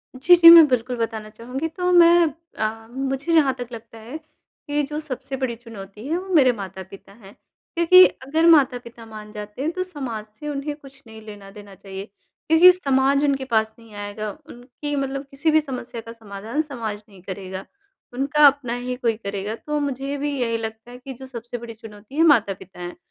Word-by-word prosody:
जी, 310 +8 +6
जी। 335 -1 +9
मैं 335 -2 +10
बिल्कुल 250 -1 -1
बताना 225 -2 -4
चाहूँगी। 250 +7 -5
तो 360 +2 -2
मैं 345 -1 +6 0.3
अ, 225 +1 -3
मुझे 270 +5 -3
जहाँ 290 -5 +4
तक 245 -1 -7
लगता 230 -1 -11
है, 240 +7 -8 0.5
कि 295 0 0
जो 300 +2 -4
सबसे 275 -2 -6
बड़ी 255 -3 -2
चुनौती 215 -2 -11
है 325 +3 0
वो 375 +2 -7
मेरे 260 -4 +6
माता-पिता 190 -1 -10
हैं 200 -2 -16 0.4
क्योंकि 345 +2 +7
अगर 310 +4 -1
माता-पिता 245 -7 +2
मान 215 -1 -11
जाते 210 +3 -8
हैं 315 - -1
तो 370 - -2
समाज 265 -12 -6
से 295 - -7
उन्हें 290 +1 -4
कुछ 275 -2 -17
नहीं 220 0 -12
लेना-देना 205 -1 -12
चाहिए, 195 0 -9 0.4
क्योंकि 325 +3 +8
समाज 275 -5 +1
उनके 275 -2 0
पास 220 -3 0
नहीं 225 -2 -17
आएगा 205 +1 -5 0.2
उनकी 250 +4 -7
मतलब 275 0 -3
किसी 285 +3 0
भी 315 0 +4
समस्या 250 -4 -7
का 230 - -11
समाधान 220 +5 -5
समाज 230 -8 -6
नहीं 195 -3 -16
करेगा, 190 0 -7 0.5
उनका 285 +4 +3
अपना 270 -4 0
ही 250 +1 -4
कोई 240 -3 0
करेगा 200 0 -5
तो 300 +5 -4
मुझे 280 0 -3
भी 290 +1 -2
यही 230 -1 0
लगता 220 +1 -7
है 245 - -10
कि 265 +2 -9
जो 265 +1 -11
सबसे 240 -2 -7
बड़ी 235 -1 -9
चुनौती 215 +2 -13
है 325 - +3
माता-पिता 200 - +1
हैं। 175 0 -7
245 Hz, 190 wpm, -22 LUFS, 220-285 Hz, 0.5 s, मैं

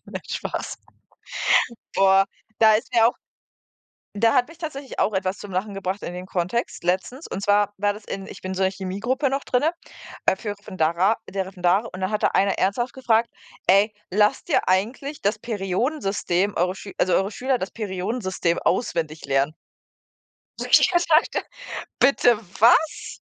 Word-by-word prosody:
nein, - - -7
Spaß. - - -4 1.2
Boah, 195 0 +5 0.3
da 220 -1 +7
ist 215 - -1
mir 230 -1 +6
auch 245 - -3 1.0
da 225 +1 +4
hat 245 - +3
mich 330 +1 -15
tatsächlich 290 -5 -7
auch 210 - +2
etwas 190 0 -1
zum 205 -2 -9
Lachen 200 +3 -2
gebracht 195 0 -3
in 175 - -5
den 180 +1 -6
Kontext 185 +4 -2
letztens. 190 - -1
Und 195 - -5
zwar 205 0 +3
war 205 +1 +1
das 210 0 -11
in 195 0 -6
ich - - -10
bin 185 0 -4
so 190 - 0
in 190 - +2
Chemiegruppe 205 +9 -2
noch 275 +1 -2
drinne, 275 +6 +2 0.5
äh, - - +4
für 210 +1 -5
Referendera 190 -1 0
äh, - - -10
der 190 -1 -2
Referendate. 190 +4 +1
Und 185 - -7
da 185 - 0
hat 210 0 -2
da - - +6
einer 195 0 +2
ernsthaft 240 +6 0
gefragt: 235 -3 +1 0.4
„Ey, 200 +3 +5 0.2
lasst 210 +2 +2
ihr - - +2
eigentlich 235 +10 0
das 210 +2 0
Periodensystem 200 - -1
eure 180 +2 +1
Schül 200 - -9
also 185 - +2
eure 195 +2 +2
Schüler 260 +4 0
das 190 - -4
Periodensystem 190 -3 -2
auswendig 165 -6 -1
lernen?“ 140 +2 +1 1.0
So, - - -3
ich - - +6
habe 345 -1 +3 0.2
gedacht: - - -4 0.5
„Bitte 245 -4 +4 0.2
was?“ 250 +8 +3
200 Hz, 170 wpm, -23 LUFS, 185-235 Hz, 1.2 s, da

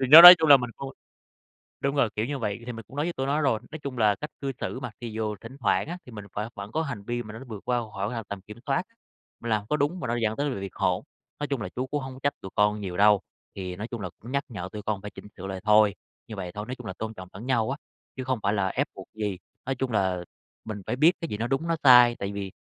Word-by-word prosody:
Thì 130 - +1
đó 160 +4 +13
nói 180 +1 +15
chung 160 -1 +2
là 140 - +11
mình 125 -2 -4
không 135 - -6 0.9
đúng 140 +1 0
rồi, 125 -6 +3
kiểu 110 - 0
như 140 +2 -3
vậy 105 -2 -2
thì 125 - -4
mình 115 -1 -8
cũng 135 - -13
nói 150 - +1
với 175 - -2
tụi 135 - -2
nó 145 +3 +1
rồi. 130 -7 +2
Nói 155 - -6
chung 140 -3 -6
là 105 -2 +4
cách 150 - -6
cư 135 -1 -1
xử 130 - -3
mà, 125 -2 -4
thì 115 -2 -5
dù 110 -1 -2
thỉnh 130 +4 -10
thoảng - - +2
á, 175 +2 -4
thì 125 - -12
mình 105 -2 -8
phải 105 +2 -2
vẫn 100 +1 -7
có 160 - 0
hành 140 -10 -4
vi 120 +2 -2
mà 105 0 -9
mà 115 - -8
nó 135 - -10
vượt 105 -3 -8
qua 125 -1 +2
khỏi 100 +2 -2
ngoài 115 -2 -3
tầm 100 -2 -5
kiểm 105 +4 -11
soát, 140 +6 +1 0.6
mình 120 - -5
làm 105 -2 +1
có 150 - +2
đúng 150 +5 0
mà 125 - -3
nó 120 - 0
dẫn 110 -2 0
tới 145 0 0
là 115 - -3
việc 95 -1 -7
hỗn. - - +1 0.4
Nói 145 - -2
chung 135 -5 -2
là - - -4
chú 130 +1 -2
cũng 145 +1 -2
hông 130 0 -6
có 130 - -11
trách 145 - +2
tụi 95 - -8
con 105 0 +3
nhiều 90 -3 -4
đâu, 105 -1 +6 0.3
thì 90 -2 -5
nói 105 +5 -5
chung 120 -3 -6
là 90 - -3
cũng 120 +4 -10
nhắc 140 +1 +1
nhở 95 -5 -5
tụi 105 - -6
con 105 -1 -2
phải 105 0 -7
chỉnh - - -11
sửa 95 +1 -6
lại 95 -1 -5
thôi, 105 -1 +5 0.3
như 110 - -7
vậy 90 -2 -5
thôi, 105 +3 -5
nói 125 - -4
chung 125 -5 -9
là 95 - -4
tôn 110 0 -4
trọng 95 -3 -9
lẫn 105 +6 -8
nhau 120 -3 +1
á, 135 - -2 0.4
chứ 130 - -3
không 130 -2 -1
phải 100 - +2
là 100 -3 +1
ép - - 0
buộc - - -10
gì. 105 -4 -2 0.3
Nói 135 - -1
chung 130 0 -2
là 95 -4 +1 0.4
mình 105 -2 -5
phải - - 0
biết 155 +6 +6
cái 165 - -2
gì 105 - -3
nó 115 +2 -1
đúng, 135 +6 -1
nó 165 - +2
sai, 125 -2 +8
tại 100 0 -3
vì 100 -1 -4
115 Hz, 315 wpm, -27 LUFS, 105-135 Hz, 0.9 s, nói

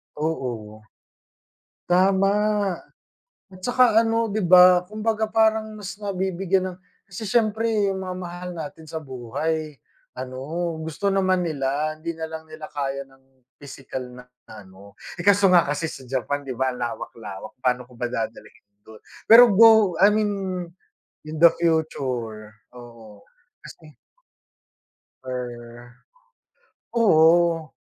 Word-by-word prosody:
Oo. 120 -9 -4 1.1
Tama 190 +2 +3 1.2
at 185 - -14
tsaka 245 -3 +3
ano 225 0 0
'di 215 +1 -2
ba, 180 0 +7
kumbaga 215 +2 -2
parang 220 -1 +1
mas 200 -1 -8
nabibigyan 190 -2 -2
ng - - -17 0.3
kasi 205 +4 -7
siyempre 220 -1 +1
yung 190 -1 -4
mga 180 0 -5
mahal 180 0 -7
natin 160 0 -8
sa 160 0 -6
buhay 145 +4 -4 0.4
ano, 130 0 -6 0.4
gusto 160 +6 -3
naman 185 -2 +1
nila. 150 +1 -2
Hindi 165 +2 -5
nalang 160 0 -6
nila 155 0 -9
kaya 140 -1 -4
ng 135 -1 -29
pisikal 135 -2 -8
na 125 0 -12 0.3
ano. 100 -1 -14 0.2
Eh, 175 - -7
kaso 200 0 +5
nga 180 -2 +5
kasi 145 +3 -2
sa 135 - -9
Japan 135 +2 -2
'di 130 -2 -5
ba 130 -1 0
ang 125 - -9
lawak-lawak. 110 -3 -7
Pa'no 125 -1 0
ko 125 - -19
ba 120 0 -3
dadalhin 125 -5 -6 0.2
dun. 110 -1 -15 0.3
Pero 240 +2 +10
go 220 -3 +6
I 200 - +8
mean, 210 -1 +1 1.0
in 155 0 -6
the 170 - +9
future. 125 -10 -2 0.2
Oo, 115 -4 -14 0.4
kasi 155 -1 -14 1.3
Per 120 -1 -8 1.0
oo. 165 -6 +3
160 Hz, 125 wpm, -23 LUFS, 130-195 Hz, 1.3 s, Pero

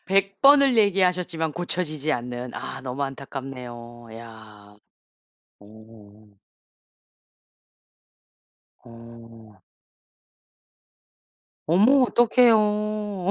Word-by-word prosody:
100 195 0 0
번을 275 -2 +5
얘기하셨지만 180 -5 0
고쳐지지 155 -3 -3
않는. 125 0 -6
아 - - -7
너무 130 +2 -5
안타깝네요. 125 -4 -9
야. 110 -3 -14 0.8
오. 105 -1 -18 2.5
어. 115 -3 -15 2.1
어머 225 - +4
어떡해요. 210 -5 +1
135 Hz, 140 characters per minute, -23 LUFS, -, 2.5 s, 번을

